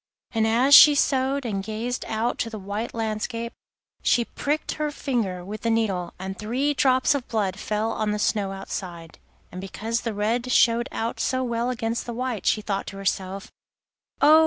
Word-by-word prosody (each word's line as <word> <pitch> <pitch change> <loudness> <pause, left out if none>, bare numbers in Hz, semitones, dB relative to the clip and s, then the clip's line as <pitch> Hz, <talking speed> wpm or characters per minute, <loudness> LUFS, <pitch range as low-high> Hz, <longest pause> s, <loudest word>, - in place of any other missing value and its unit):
And 225 -2 +1
as 245 +5 +3
she 295 0 +10
sewed 270 -1 +1
and 200 -4 -2
gazed 220 +4 -3
out 225 +2 -1
to 230 - -1
the 220 - -6
white 205 +4 -4
landscape, 230 +1 -3 0.5
she 235 - +3
pricked 295 +5 -2
her 305 -1 -2
finger 225 -11 -2
with 210 +3 -6
the 230 - 0
needle, 200 -6 0
and 190 +1 -5
three 255 +7 0
drops 260 0 +3
of 275 -3 -3
blood 200 -3 -1
fell 215 +2 -1
on 215 -1 -1
the 210 - 0
snow 205 -2 0
outside, 175 -4 -7 0.3
and 185 - -7
because 220 +4 -3
the 230 -3 -3
red 235 +5 0
showed 235 -1 +4
out 230 +1 -3
so 260 0 0
well 235 0 -1
against 230 -1 -2
the 240 - -3
white 245 -2 -3
she 215 - +3
thought 200 -2 -2
to 195 - -7
herself: 195 0 -3 0.7
'Oh! 310 +2 +7
225 Hz, 180 wpm, -25 LUFS, 205-245 Hz, 0.7 s, she